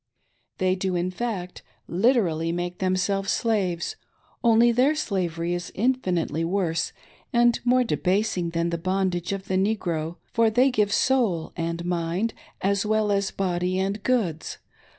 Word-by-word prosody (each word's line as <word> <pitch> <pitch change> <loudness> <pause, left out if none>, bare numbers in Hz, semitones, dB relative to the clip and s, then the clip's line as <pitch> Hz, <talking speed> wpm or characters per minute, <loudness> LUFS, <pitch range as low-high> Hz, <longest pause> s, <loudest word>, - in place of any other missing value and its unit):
They 185 -1 +2
do, 185 0 -1
in 175 +1 0
fact, 185 -4 -4 0.3
literally 175 -5 +2
make 175 +1 -3
themselves 190 +1 0
slaves, 190 -7 0 0.5
only 235 0 +5
their 260 +6 +3
slavery 175 - -1
is 175 0 -4
infinitely 185 - 0
worse 165 -2 0 0.4
and 240 0 +4
more 250 +1 +4
debasing 190 -4 0
than 170 0 -1
the 170 - -2
bondage 185 0 -1
of 195 0 -4
the 190 - 0
Negro, 175 -5 -1 0.2
for 230 -1 +4
they 250 +5 +3
give 210 -4 +1
soul 215 -11 +1
and 170 0 -3
rnind, 175 +5 -1 0.3
as 200 0 +1
well 215 -1 +1
as 200 -1 +1
body 180 -1 -1
and 195 +2 -1
goods. 200 -11 -1
190 Hz, 140 wpm, -25 LUFS, 175-220 Hz, 0.5 s, only